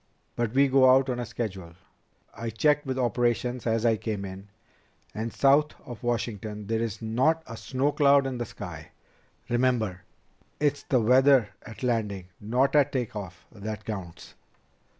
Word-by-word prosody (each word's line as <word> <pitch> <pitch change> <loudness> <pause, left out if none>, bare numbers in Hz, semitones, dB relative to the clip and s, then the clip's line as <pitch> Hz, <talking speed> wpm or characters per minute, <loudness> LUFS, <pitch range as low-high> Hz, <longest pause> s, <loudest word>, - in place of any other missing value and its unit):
"But 120 -2 -1
we 140 +1 +5
go 130 -1 +5
out 130 0 +4
on 125 0 -2
schedule. 95 -8 -5 0.6
I 115 0 -5
checked 145 +6 +1
with 130 0 -2
operations 120 0 0
as 115 0 +1
I 115 -1 +3
came 105 -2 -4
in, 95 +1 -9 0.7
and 115 +2 -4
south 145 +2 +3
of 120 -2 -9
Washington 110 -3 -3
there's 110 0 -2
not 130 +9 +1
a 115 - -8
snow 130 +5 -1
cloud 140 -2 +4
in 130 -2 -3
the 120 - -2
sky. - - -9 0.5
Remember, 120 -6 0 0.6
it's 145 -1 +1
the 130 - +1
weather 130 0 +5
at 110 - -11
landing, 105 -7 -1
not 125 +7 +1
at 145 -1 +4
take 125 -5 -3
off, 95 -4 -8
that 110 0 -7
counts." 95 -6 -7
120 Hz, 150 wpm, -27 LUFS, 110-130 Hz, 0.7 s, we